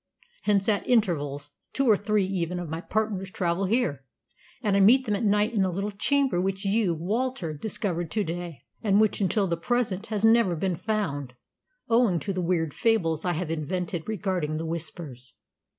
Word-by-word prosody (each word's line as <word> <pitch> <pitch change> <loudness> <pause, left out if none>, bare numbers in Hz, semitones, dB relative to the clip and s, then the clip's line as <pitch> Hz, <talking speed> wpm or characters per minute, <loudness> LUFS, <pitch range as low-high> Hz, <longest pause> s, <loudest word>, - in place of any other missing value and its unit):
Hence, 200 -2 +2
at 210 -2 +1
intervals, 145 - +1 0.2
two 275 -1 +1
or 220 - +7
even 205 - -2
three 195 -4 +1 0.2
of 175 - -5
my 160 +2 -4
partners 205 -2 -2
travel 180 0 -1
here, 185 - 0 0.6
and 205 -3 +2
I - - +4
meet 245 +7 +6
them 210 -3 0
at 200 - -2
night 210 +2 +2
in 210 - +2
the 190 - +2
little 195 +4 -2
chamber 260 0 +1
which 195 +1 -2
you, 195 -3 +2
Walter, 200 0 -2
discovered 175 0 -3
to 210 +4 0
day, 170 -2 -6 0.2
and 205 -2 +3
which 215 -1 +2
until 195 +2 +2
the 170 -2 -1
present 220 +1 -1
has 215 -1 0
never 225 -5 +4
been 180 +2 -1
found, 145 - -2 0.5
owing 230 -7 +3
to 195 - -2
the 185 - -2
weird 165 -4 0
fables 165 -9 +1
I 175 - +1
have 165 -1 -3
invented 170 +3 -3
regarding 185 -7 -1
the 165 - -3
Whispers. 160 -6 -6
190 Hz, 180 wpm, -26 LUFS, 170-215 Hz, 0.6 s, or